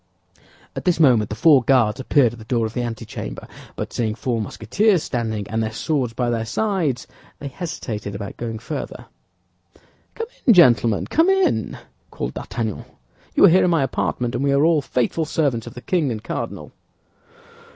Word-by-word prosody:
At - - -6
this 175 -2 +2
moment 125 -9 +4
the 105 - -4
four 145 +3 +5
Guards 120 -4 +3
appeared 130 -3 +3
at 120 - -11
the - - -10
door 115 -1 0
of 110 - -5
the 125 - -2
antechamber, 115 - -6 0.3
but - - -5
seeing 110 -3 -1
four 120 -1 -2
Musketeers 170 - +1
standing, 110 -4 -3
and 110 +2 -1
their 110 0 -2
swords 130 +1 -1
by 120 +1 -1
their 115 -1 -1
sides, 155 - -1 0.3
they 140 - -7
hesitated 110 - -5
about 100 0 -6
going 115 -1 -5
farther. 140 +6 -6 1.1
"Come 455 - -3 0.2
in, 235 - +7
gentlemen, 120 - +5
come 330 +4 +2
in," 385 -1 +1 0.3
called - - -5
D'Artagnan; - - -4 0.5
"you - - +7
are - - +8
here 185 +3 +5
in - - +2
my 165 -5 +2
apartment, 125 -2 -2
and 135 - -1
we 140 - +2
are 140 +2 +3
all 165 -2 +3
faithful 135 +4 -1
servants 140 -7 -1
of - - -10
the 125 - -8
king 165 -1 0
and 110 -2 -5
cardinal." - - -5
125 Hz, 180 wpm, -21 LUFS, 110-160 Hz, 1.1 s, are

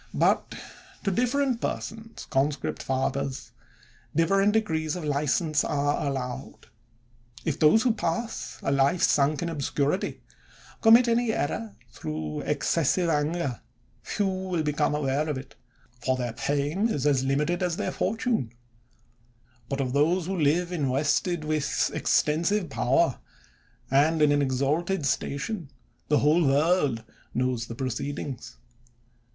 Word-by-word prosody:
But - - +2 0.5
to 195 - +1
different 250 +3 +1
persons, 225 0 -5
conscript 140 +1 0
fathers, 135 +1 -2 0.6
different 195 +5 +3
degrees 160 -8 0
of 180 - -5
license 150 +1 +1
are 145 0 0
allowed. 125 -3 -5 0.8
If 155 -2 -1
those 160 +8 +5
who 245 -3 +3
pass 225 +3 -3
a - - 0
life 140 +5 +2
sunk 145 +3 +3
in 170 - -2
obscurity, 145 +2 -1 0.6
commit 235 +2 +7
any 235 0 +2
error, 115 - -2 0.2
through 75 -1 -5
excessive 165 +3 +1
anger, 150 -3 -1 0.4
few 185 -4 -1
become 150 0 +1
aware 150 +1 0
of 145 - -1
it, 130 0 -9 0.5
for 130 0 +1
their 120 -2 -3
fame 145 - 0
is 145 - -1
as 140 -3 +3
limited 150 +6 0
as 180 -2 0
their - - -1
fortune; 220 - -1 1.2
but 140 - -2
of 130 -2 -1
those 160 +5 +2
who 190 +2 -2
live 170 +2 +1
invested 150 +3 0
with 155 -2 0
extensive 170 +3 +1
power, 135 +3 +2 0.7
and 150 +4 +4
in 150 - +5
an 145 0 +3
exalted 145 +6 0
station, 145 - -2 0.4
the 150 - +3
whole 155 +5 +4
world 145 -4 +2 0.3
knows 125 -2 0
the 115 - -7
proceedings. 130 0 -4
150 Hz, 125 wpm, -27 LUFS, 135-180 Hz, 1.2 s, commit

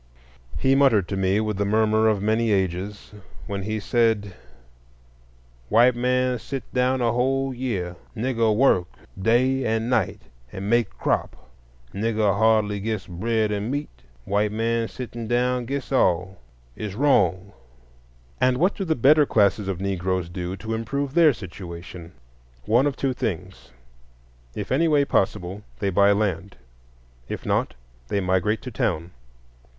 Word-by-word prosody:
He 135 0 +2
muttered 130 -9 +4
to - - -2
me 95 +1 +1
with 105 -2 -2
the 100 - +1
murmur 110 +1 +2
of 105 -2 +1
many 110 +2 +1
ages, 95 +1 -2 0.3
when 100 -1 -4
he 110 +2 -3
said: 110 -2 +1 1.4
"White 120 +2 +5
man 125 0 +1
sit 135 +3 -5
down 125 0 +1
whole 130 +3 +1
year; 105 -9 -3 0.2
Nigger 115 -1 +1
work 105 -8 +3 0.3
day 130 +5 +2
and 115 +1 -1
night 115 -7 0 0.3
and 95 +1 -6
make 120 0 +3
crop; 65 -1 -2 0.5
Nigger 105 0 +1
hardly 105 -1 +2
gits 110 -1 -3
bread 110 +4 -1
and 105 +2 -2
meat; 145 +2 -3 0.3
white 105 +1 +1
man 115 +1 0
sittin' 120 -2 -7
down 125 +1 +1
gits 140 +1 -4
all. 95 -6 +1 0.4
It's 105 -2 -5
wrong." 100 - +2 0.9
And 130 0 +3
what 180 +7 +2
do 195 - -4
the 160 -4 0
better 145 +4 +5
classes 105 -1 +2
of 95 -3 -3
Negroes 95 -2 -2
do 90 +1 -4
to 110 +5 -5
improve 135 +5 -3
their 165 -2 +6
situation? 85 -4 -9 0.5
One 120 +6 +3
of 140 - -2
two 135 -1 -1
things: 95 - -5 0.9
if 105 -2 -5
any 155 +6 +3
way 145 -3 +3
possible, 95 -3 -1 0.2
they 100 -1 -1
buy 100 +2 +4
land; 100 -4 -1 0.7
if - - -5
not, - - 0 0.3
they 100 - 0
migrate 95 +3 0
to 125 - -6
town. 85 -4 -2
110 Hz, 145 wpm, -24 LUFS, 95-125 Hz, 1.4 s, their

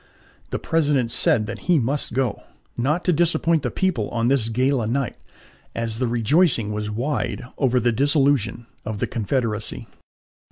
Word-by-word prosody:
The - - -2
President 145 -7 +1
said 110 -2 +2
that - - -6
he 175 - +6
must 140 +1 -1
go, 130 -5 0 0.3
not 150 +8 0
to 180 - +3
disappoint 165 0 +2
the - - -1
people 180 - -1
on 115 0 0
this 130 -5 +1
gala 125 0 +1
night, 130 +2 -1 0.6
as 115 -1 -2
the 130 - +1
rejoicing 120 - +2
was 105 0 -3
wide 125 +4 -2 0.2
over 130 -3 +3
the 120 0 +2
dissolution 135 -3 +1 0.2
of 110 -1 -4
the - - 0
Confederacy. 115 -1 -2
125 Hz, 155 wpm, -23 LUFS, 115-145 Hz, 0.6 s, he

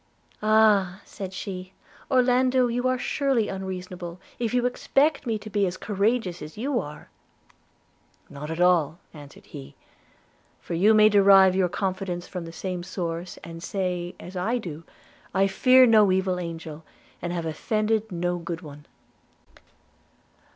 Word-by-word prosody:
'Ah!' 210 -3 +3
said 190 -2 -7
she, 190 -1 -7 0.4
'Orlando, 255 0 +3
you 245 +1 0
are 255 0 +1
surely 265 -4 0
unreasonable, 185 -2 -6 0.2
if 230 -3 -1
you 245 0 +1
expect 275 +3 +1
me 225 -2 0
to 210 - -11
be 205 -2 +1
as 180 +1 -4
courageous 205 -3 -1
as 155 +4 -9
you 255 +2 -1
are!' 150 -6 -9 1.2
'Not 145 +2 -8
at 160 +1 -4
all,' 175 -3 +3 0.2
answered 145 -3 -13
he; 70 +1 -11 0.8
'for - - -7
you 205 +6 +4
may 215 0 +7
derive 195 -2 +6
your 185 -2 +2
confidence 185 -2 -3
from 180 -3 -6
the 165 - -8
same 180 +1 -4
source, 175 -1 -5
and 165 0 -9
say, 180 -2 -3
as 185 - -10
I 210 +7 0
do, 165 -8 -7 0.5
I 195 - +4
fear 255 +6 +5
no 215 -4 +5
evil 185 -1 0
angel, 165 -2 -7 0.4
and 175 - -3
have 170 -2 -3
offended 215 +7 -1
no 175 0 -2
good 170 0 -5
one.' 145 -2 -12
190 Hz, 145 wpm, -25 LUFS, 175-220 Hz, 1.2 s, may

